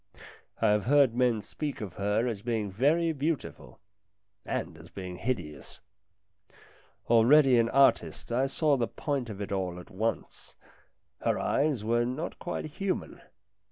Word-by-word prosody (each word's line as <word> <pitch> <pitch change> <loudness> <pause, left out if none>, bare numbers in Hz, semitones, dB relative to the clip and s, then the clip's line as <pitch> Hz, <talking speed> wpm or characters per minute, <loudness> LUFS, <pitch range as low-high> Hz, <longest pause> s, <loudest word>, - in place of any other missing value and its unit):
I 110 - +3
have 105 -1 +2
heard 140 -2 +4
men 120 -3 +1
speak 150 -2 -5
of 100 -5 -6
her 105 +5 0
as 110 -5 -3
being 110 -3 -2
very 160 - +2
beautiful 150 +1 -4 0.7
and - - -4
as - - -14
being 90 -2 -7
hideous. 85 - -5 1.3
Already 125 +3 +6
an 115 0 +2
artist, 135 -2 +2
I 130 +3 +2
saw 145 +1 +1
the 120 -2 0
point 140 -5 -3
of 105 -2 -7
it 100 - -7
all 90 -2 -2
at 90 - -13
once: 110 +4 -4 0.7
her - - +1
eyes 140 -7 0
were 120 +2 +2
not 130 +8 -4
quite 175 - -4
human. 185 +5 -4
120 Hz, 145 wpm, -29 LUFS, 105-140 Hz, 1.3 s, Already